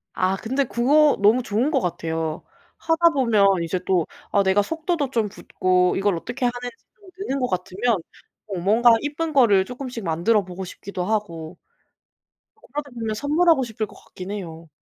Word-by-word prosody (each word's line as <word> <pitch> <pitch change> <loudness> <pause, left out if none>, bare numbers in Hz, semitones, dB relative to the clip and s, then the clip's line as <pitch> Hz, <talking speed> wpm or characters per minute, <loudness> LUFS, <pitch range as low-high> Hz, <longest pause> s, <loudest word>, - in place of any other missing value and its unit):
아 185 +1 +1
근데 265 +7 -1
그거 285 +6 +3
너무 220 +5 +5
좋은 245 +6 0
것 270 - +2
같아요. 165 -2 -3 0.3
하다 330 +1 +3
보면 205 - +3
이제 170 +2 -2
또 180 -4 +2 0.3
아 200 - +3
내가 190 +2 +3
속도도 320 - -2
좀 225 -4 +1
붙고 185 -2 +1
이걸 195 -2 +1
어떻게 245 +8 -4
하는지 245 0 -3 0.2
좀 395 -3 -17
느는 275 -9 -2
거 250 - 0
같으면 190 +4 -1 0.5
어 195 -4 -4
뭔가 225 +6 +4
이쁜 310 +2 -3
거를 215 -8 +5
쪼끔씩 250 -3 -7
만들어보고 185 +2 0
싶기도 185 0 -6
하고 180 -7 -3 1.2
그러다 290 0 -4
보면 225 -2 -3
선물하고 305 +3 +3
싶을 225 -2 -3
것 - - -16
같긴 185 +2 -8
해요. 165 -5 -7
220 Hz, 325 characters per minute, -23 LUFS, 185-265 Hz, 1.2 s, 너무